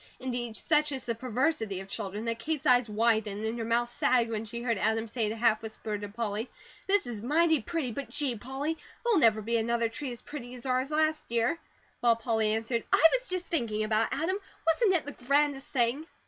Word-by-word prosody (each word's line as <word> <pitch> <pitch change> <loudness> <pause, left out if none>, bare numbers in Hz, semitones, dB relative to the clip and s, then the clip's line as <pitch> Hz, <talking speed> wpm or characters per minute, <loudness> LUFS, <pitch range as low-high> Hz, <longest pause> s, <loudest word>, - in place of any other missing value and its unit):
Indeed, 245 -3 -3
such 300 -1 +2
is 265 -3 -3
the 235 - 0
perversity 245 - -1
of 190 - -8
children 205 +1 -4
that 230 0 -2
Kate's 310 +3 -3
eyes 245 -3 +4
widened 215 -1 +1
and 225 +2 -2
her - - -1
mouth 235 +1 +1
sagged 240 -2 +2
when 220 0 -2
she 235 +2 -6
heard 230 -5 0
Adam 220 +2 +1
say 225 -1 -1
in - - -1
a - - -3
half 225 -1 +2
whisper 220 -1 -5
to 205 0 -5
Polly: 220 +1 -3 0.4
"This 400 -3 +3
is 235 -4 -5
mighty 315 +4 +3
pretty, 290 0 -2
but 275 +5 -5
gee, 285 -4 0
Polly, 270 +8 -4 0.2
there'll 470 -7 +3
never 220 -5 +4
be 230 +2 +1
another 230 0 +1
tree 255 +3 -5
as 240 - -9
pretty 255 -4 -8
as 245 - -9
ours 255 +1 0
last 310 0 0
year!" 235 +8 +1 0.4
While 235 -1 +4
Polly 220 -2 +1
answered: 225 +1 -1
"I - - +4
was - - 0
just 365 -1 -2
thinking 230 -11 -1
about 215 +1 +1
it, - - -1
Adam. 365 +5 0 0.3
Wasn't 380 +5 +3
it 340 - +1
the 290 -3 -9
grandest 280 0 +2
thing?" 255 +5 +1
240 Hz, 220 wpm, -29 LUFS, 225-290 Hz, 0.4 s, eyes